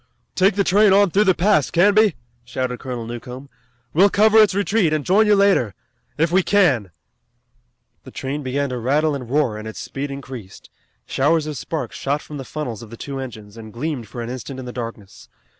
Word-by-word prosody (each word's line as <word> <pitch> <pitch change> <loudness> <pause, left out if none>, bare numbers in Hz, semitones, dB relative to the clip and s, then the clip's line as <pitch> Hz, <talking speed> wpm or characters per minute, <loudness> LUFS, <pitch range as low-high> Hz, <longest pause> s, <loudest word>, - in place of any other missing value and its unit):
"Take 190 +1 +3
the 200 - +2
train 200 +1 +4
on 200 -2 +4
through 205 +4 +3
the 185 -2 +4
pass, 180 -7 +2
Canby!" 205 +2 +4 0.3
shouted 125 0 -4
Colonel 125 -3 -5
Newcomb. 125 +3 -8 0.4
"We'll 190 +6 +5
cover 215 +2 +5
its 205 -4 +3
retreat, 200 -4 +1
and 155 -2 -1
join 210 +4 +4
you 210 - +5
later 195 - +2 0.4
if 165 +1 +1
we 185 +2 +4
can." 160 - +2 1.1
The - - -11
train 140 +3 -4
began 140 +1 -2
to 125 -1 -4
rattle 145 +6 +1
and 125 -4 -6
roar, 130 -6 0
and 110 - -8
its 110 - -8
speed 140 +1 -5
increased. 130 -7 -9 0.3
Showers 150 +3 +1
of 155 -1 -5
sparks 155 +4 -5
shot 145 +2 -2
from 150 - -8
the 135 - -6
funnels 125 -8 -5
of 115 - -11
the 115 - -10
two 135 +2 -6
engines, 110 -5 -9
and 110 -1 -10
gleamed 125 -1 -4
for 120 +1 -6
an 115 - -6
instant 130 +1 -7
in 130 - -7
the 125 - -7
darkness. 115 -5 -8
140 Hz, 200 wpm, -21 LUFS, 125-185 Hz, 1.1 s, We'll